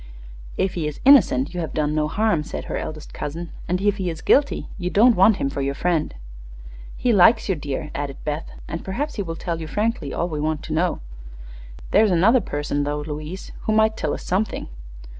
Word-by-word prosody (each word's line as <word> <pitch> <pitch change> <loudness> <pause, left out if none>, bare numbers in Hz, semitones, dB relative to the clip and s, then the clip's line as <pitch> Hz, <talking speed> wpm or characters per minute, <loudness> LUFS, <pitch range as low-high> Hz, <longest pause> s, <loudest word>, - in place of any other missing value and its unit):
"If 190 0 0
he 165 -4 -2
is 150 - -6
innocent, 180 - +5
you 180 - -3
have 160 -3 -4
done 150 -1 0
no 155 0 +1
harm," 210 -1 +1
said 150 - -6
her - - -4
eldest 155 -1 -6
cousin; 165 +4 -5 0.2
"and 180 +1 0
if 205 +1 +1
he 185 -3 -2
is 160 -1 -6
guilty 285 +1 +2
you 180 -1 -2
don't 225 +5 +5
want 195 +3 +5
him - - -1
for 140 0 -3
your 140 0 -1
friend." 165 - 0 0.8
"He 245 - +1
likes 220 +4 +5
you, 195 - +2
dear," 145 -3 -4
added 140 -1 -4
Beth, 150 +1 -3 0.2
"and 165 - -5
perhaps 275 +11 -3
he - - 0
will 165 -4 -4
tell 165 0 -4
you 160 - -5
frankly 210 - -1
all 170 - -1
we 155 -4 -4
want 155 0 -1
to 155 - -5
know. 170 +2 0 0.9
There's 215 +1 +5
another 200 +8 +4
person, 145 -4 -2
though, 145 +1 -2
Louise, 150 +4 -6
who 215 - +1
might 220 0 +3
tell 155 -8 -2
us - - -9
something." 195 - -1
170 Hz, 210 wpm, -22 LUFS, 150-205 Hz, 0.9 s, innocent